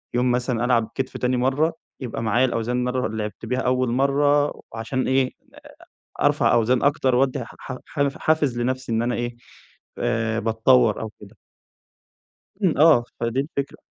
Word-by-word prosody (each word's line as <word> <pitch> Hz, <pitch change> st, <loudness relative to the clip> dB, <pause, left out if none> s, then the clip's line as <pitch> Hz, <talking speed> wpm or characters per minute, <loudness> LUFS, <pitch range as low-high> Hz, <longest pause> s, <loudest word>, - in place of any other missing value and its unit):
يوم 125 Hz, +1 st, +2 dB
مثلًا 125 Hz, -1 st, 0 dB
ألعب 120 Hz, -3 st, +1 dB
كتف 130 Hz, -1 st, -3 dB
تاني 125 Hz, 0 st, 0 dB
مرّة، 135 Hz, +6 st, +1 dB, 0.3 s
يبقى 120 Hz, -2 st, -4 dB
معايا 120 Hz, +3 st, +3 dB
الأوزان 125 Hz, 0 st, -1 dB
مرّة 125 Hz, 0 st, -1 dB
لعبت 110 Hz, 0 st, -5 dB
بيها 125 Hz, +3 st, -1 dB
أول 130 Hz, -1 st, +1 dB
مرّة، 145 Hz, +3 st, +2 dB
علشان 130 Hz, +4 st, -2 dB
إيه، 130 Hz, -1 st, +2 dB, 0.9 s
أ -, -, +1 dB
أرفع -, -, +3 dB
أوزان 120 Hz, +2 st, +2 dB
أكتر، 135 Hz, -3 st, +2 dB
وادي 130 Hz, 0 st, +1 dB
ح -, -, -14 dB, 0.3 s
ح 140 Hz, -2 st, 0 dB
حافز 150 Hz, -6 st, +1 dB
لنفسي 130 Hz, 0 st, -2 dB
إن 115 Hz, 0 st, +1 dB
أنا 120 Hz, +1 st, 0 dB
إيه 120 Hz, 0 st, -3 dB, 0.6 s
آآ، 115 Hz, -2 st, 0 dB
باتطوّر 115 Hz, 0 st, +3 dB
أو 110 Hz, -, -4 dB
كده. 105 Hz, +1 st, -14 dB, 1.3 s
إمم. 180 Hz, -5 st, +2 dB
آه 150 Hz, -6 st, +6 dB, 0.2 s
فدي 115 Hz, +2 st, 0 dB
الفكرة. 140 Hz, -1 st, -4 dB
125 Hz, 155 wpm, -23 LUFS, 115-135 Hz, 1.3 s, آه